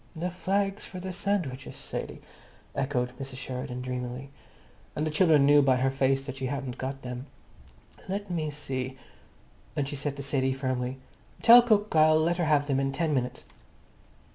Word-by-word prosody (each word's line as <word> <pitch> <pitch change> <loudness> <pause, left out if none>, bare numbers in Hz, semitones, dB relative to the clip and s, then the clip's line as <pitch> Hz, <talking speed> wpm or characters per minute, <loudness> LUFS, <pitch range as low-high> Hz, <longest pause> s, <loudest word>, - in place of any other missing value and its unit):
"The 175 +3 -2
flags 195 +3 -1
for 185 - -7
the 185 +1 -5
sandwiches, 175 -9 -2
Sadie?" - - -6 0.5
echoed 130 -3 0
Mrs. 135 -1 -6
Sheridan 125 -1 -5
dreamily. 125 +1 -5 0.6
And 150 - -1
the 155 - -1
children 155 -3 +5
knew 145 +1 +7
by 135 -2 +4
her 130 +1 +1
face 135 0 +1
that 135 -1 -6
she 135 -1 -2
hadn't 130 -1 -4
got 135 +1 -4
them. 125 +2 -6 0.8
"Let 200 0 -3
me 160 -3 -1
see." 130 -3 -4 0.8
And 140 - 0
she 145 - -4
said 140 0 -3
to 140 - -5
Sadie 135 -1 0
firmly, 130 -1 -2 0.5
"Tell 240 +1 +10
cook 215 -5 +2
I'll 155 0 +6
let 170 +2 +1
her 175 - +1
have 145 -2 +3
them 135 -2 +1
in 135 0 0
ten 155 +2 0
minutes." 125 -2 -2
140 Hz, 170 wpm, -28 LUFS, 130-160 Hz, 0.8 s, Tell